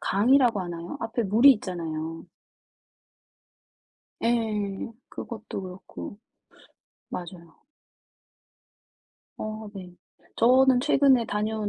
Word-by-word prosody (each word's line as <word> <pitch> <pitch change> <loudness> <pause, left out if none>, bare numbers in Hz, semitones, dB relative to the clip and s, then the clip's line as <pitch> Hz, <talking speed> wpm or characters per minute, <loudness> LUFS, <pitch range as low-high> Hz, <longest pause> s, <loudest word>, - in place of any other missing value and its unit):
강이라고 235 +1 +3
하나요? 175 +7 -6
앞에 230 0 -2
물이 230 +8 +7
있잖아요. 165 -5 -5 2.0
예. 220 -3 -1 0.2
그것도 220 -4 -7
그렇고. 185 +2 -9 0.9
맞아요. 170 -1 -8 1.8
어 215 0 -5
네. 180 -2 -9 0.4
저는 255 +1 +5
최근에 270 -4 +4
다녀온 210 0 -2
215 Hz, 180 characters per minute, -26 LUFS, 185-235 Hz, 2.0 s, 물이